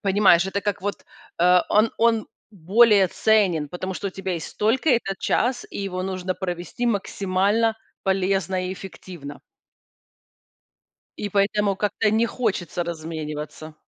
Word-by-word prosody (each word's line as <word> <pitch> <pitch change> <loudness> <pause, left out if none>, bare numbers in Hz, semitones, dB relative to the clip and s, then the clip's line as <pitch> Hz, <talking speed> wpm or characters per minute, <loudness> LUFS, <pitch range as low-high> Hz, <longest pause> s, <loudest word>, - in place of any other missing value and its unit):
понимаешь, 195 -3 +4
это 200 +1 -2
как 205 -1 -2
вот, 205 0 -4 0.4
э, 180 +1 +6
он 215 +2 +3
он 225 -1 +3 0.2
более 200 +1 +4
ценен, 185 -8 +2
потому 185 +4 -5
что 200 - -3
у - - -8
тебя 190 0 -4
есть 165 - -7
только 245 +8 +2
этот 210 -6 +1
час, 245 +1 0
и - - -5
его 185 -2 -3
нужно 185 -1 -3
провести 180 +6 -4
максимально 205 +1 +1 0.3
полезно 190 -1 0
и - - -3
эффективно. 175 -6 -9 1.8
И 205 - -3
поэтому 200 0 +1
как-то 210 +1 0
не 225 +2 +2
хочется 190 -8 -2
размениваться. 155 -2 -6
195 Hz, 135 wpm, -23 LUFS, 180-210 Hz, 1.8 s, э